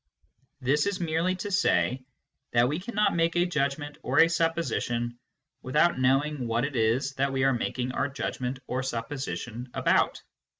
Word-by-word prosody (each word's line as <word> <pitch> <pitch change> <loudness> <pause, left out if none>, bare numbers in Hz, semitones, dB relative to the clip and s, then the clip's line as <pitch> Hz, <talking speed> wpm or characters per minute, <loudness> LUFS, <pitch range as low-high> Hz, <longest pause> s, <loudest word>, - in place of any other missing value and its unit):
This 140 +6 +2
is 200 -2 -1
merely 170 +2 0
to 200 +2 -5
say 125 - +2 0.5
that 120 0 +4
we 150 +5 -1
cannot 210 0 0
make 165 0 +1
a 175 0 +3
judgment 145 -3 -2
or 130 +2 -2
a 165 +2 +7
supposition 165 -8 -1 0.4
without 150 +3 +2
know 130 +2 +4
ing 150 -5 -4
what 115 +2 +1
it 140 -1 -5
is 120 +4 +1
that 135 +1 +1
we 135 -1 0
are 135 0 +4
making 125 +1 -2
our 140 +2 0
judgment 130 -1 -3
or 130 +1 -2
sup 115 -3 -3
position 125 -4 -5
about. - - +2
135 Hz, 170 wpm, -27 LUFS, 125-165 Hz, 0.5 s, a